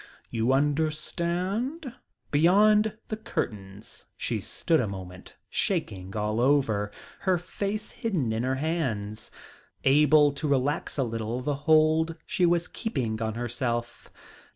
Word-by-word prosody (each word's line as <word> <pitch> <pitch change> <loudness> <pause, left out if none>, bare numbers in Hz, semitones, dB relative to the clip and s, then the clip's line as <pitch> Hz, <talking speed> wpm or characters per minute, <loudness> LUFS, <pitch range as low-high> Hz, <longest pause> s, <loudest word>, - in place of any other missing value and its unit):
You 115 +2 +1
understand?" 170 - -1 0.4
Beyond 210 +7 +4
the 215 - -2
curtains 100 - -5
she - - -2
stood 160 -2 0
a 115 - 0
moment, 95 -2 -9
shaking 95 +1 -2
all 105 +1 0
over, 120 -7 +2 0.3
her 185 -2 +2
face 200 +4 -4
hidden 185 - -1
in 110 - -1
her 130 +2 0
hands, 130 -9 -2 0.5
able 150 +1 +5
to 145 +2 -4
relax 140 +3 0
a 135 - +2
little 115 +1 -3
the 145 +3 -1 0.2
hold 160 +1 +4
she 180 - +2
was 170 0 +2
keeping 125 - -3
on 110 -1 -2
herself. 120 0 -3
145 Hz, 125 wpm, -27 LUFS, 115-170 Hz, 0.5 s, able